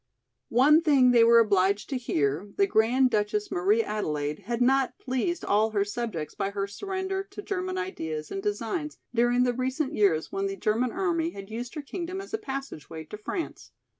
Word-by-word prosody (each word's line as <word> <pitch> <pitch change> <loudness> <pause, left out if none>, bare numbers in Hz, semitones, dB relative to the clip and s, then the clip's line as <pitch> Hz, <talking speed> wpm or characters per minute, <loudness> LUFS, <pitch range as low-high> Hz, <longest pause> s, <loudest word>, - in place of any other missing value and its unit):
One 295 +7 +5
thing 275 -6 +5
they 235 -2 +6
were 235 0 +7
obliged 200 -2 +3
to - - 0
hear, 155 - -1
the 395 - +5
Grand 250 - +3
Duchess 230 - 0
Marie 395 +5 +2
Adelaide 150 - -2
had 235 +2 -2
not 265 +1 +2
pleased 265 +7 -2
all 215 +2 +3
her 205 -2 0
subjects 205 -7 -4
by 195 -1 -2
her 200 0 -2
surrender 380 - -3
to 400 +1 -9
German 370 -2 -3
ideas 160 - -4
and 390 - -3
designs 375 -6 -3 0.2
during 240 +1 +3
the 245 -1 +2
recent 260 +4 -2
years 175 -7 +2
when 195 0 -1
the 195 0 -4
German 225 +5 +1
army 340 -3 0
had 195 -8 -10
used 240 +6 -5
her 300 - -5
kingdom 360 +5 -5
as 395 +2 -9
a 440 - 0
passageway 265 - -6
to 185 +7 -9
France. 330 - -5
245 Hz, 185 wpm, -27 LUFS, -, 0.2 s, were